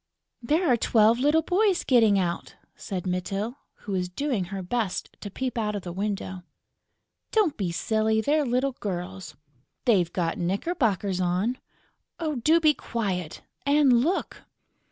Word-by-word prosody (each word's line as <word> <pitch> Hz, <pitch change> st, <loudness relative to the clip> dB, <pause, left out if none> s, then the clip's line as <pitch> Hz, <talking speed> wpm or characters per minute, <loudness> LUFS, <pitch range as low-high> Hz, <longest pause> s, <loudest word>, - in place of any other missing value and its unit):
"There 310 Hz, +9 st, +1 dB
are 245 Hz, -4 st, +4 dB
twelve 225 Hz, +1 st, +4 dB
little 300 Hz, +4 st, +3 dB
boys 375 Hz, +2 st, +2 dB
getting 225 Hz, -6 st, +4 dB
out!" 175 Hz, -2 st, -2 dB, 0.2 s
said 185 Hz, -3 st, -5 dB
Mytyl, 195 Hz, +7 st, -3 dB, 0.3 s
who 205 Hz, -, -5 dB
was 180 Hz, -2 st, -1 dB
doing 230 Hz, -1 st, -1 dB
her 190 Hz, +1 st, -5 dB
best 215 Hz, 0 st, -2 dB
to 205 Hz, -, -6 dB
peep 250 Hz, +3 st, -3 dB
out 210 Hz, -1 st, -1 dB
of 200 Hz, -, -4 dB
the 175 Hz, -, -6 dB
window. 195 Hz, -1 st, -3 dB, 0.9 s
"Don't 420 Hz, -9 st, +2 dB
be 190 Hz, -5 st, -2 dB
silly!... 220 Hz, +4 st, +1 dB
They're 295 Hz, +6 st, +2 dB
little 255 Hz, +1 st, 0 dB
girls...." 185 Hz, -4 st, -5 dB, 0.5 s
"They've 185 Hz, -9 st, +3 dB
got 170 Hz, -3 st, -1 dB
knickerbockers 200 Hz, -, 0 dB
on...." 185 Hz, +8 st, 0 dB, 0.6 s
"Do 310 Hz, 0 st, +2 dB
be 310 Hz, -2 st, +5 dB
quiet!... 190 Hz, -, -3 dB, 0.2 s
And 280 Hz, -4 st, +4 dB
look!..." 355 Hz, +6 st, -2 dB
220 Hz, 140 wpm, -26 LUFS, 185-275 Hz, 0.9 s, be